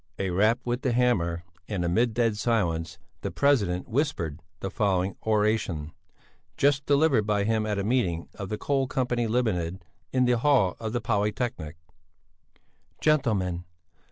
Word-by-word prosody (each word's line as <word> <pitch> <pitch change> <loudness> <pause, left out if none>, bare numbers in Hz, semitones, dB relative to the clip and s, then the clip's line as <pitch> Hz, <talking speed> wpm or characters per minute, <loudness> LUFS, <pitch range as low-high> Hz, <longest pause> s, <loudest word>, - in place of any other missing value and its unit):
A 95 -2 -1
rap 105 +6 +3
with 120 +1 -1
the 130 -3 0
hammer 90 -9 +1 0.3
and 95 -5 -1
amid 110 +6 +1
dead 115 -3 +2
silence 90 -8 -1 0.2
the - - -2
president 105 -11 +1
whispered 110 - -1 0.2
the 95 - -4
following 95 -2 0
oration: 105 -8 0 0.7
just 140 0 +2
delivered 140 -7 +3
by 105 -1 +2
him 110 0 0
at 105 -1 -1
a 100 - -1
meeting 100 -8 0
of 100 -2 -7
the 105 - -2
Coal 135 +1 0
Company 125 -3 0
Limited, 95 -7 -1 0.3
in 130 -1 +2
the 125 -1 +2
hall 125 -9 +3
of 110 -1 -4
the 120 - -1
Polytechnic. 105 -6 -2 1.2
"Gentlemen! 105 - +1
110 Hz, 145 wpm, -27 LUFS, 90-125 Hz, 1.2 s, rap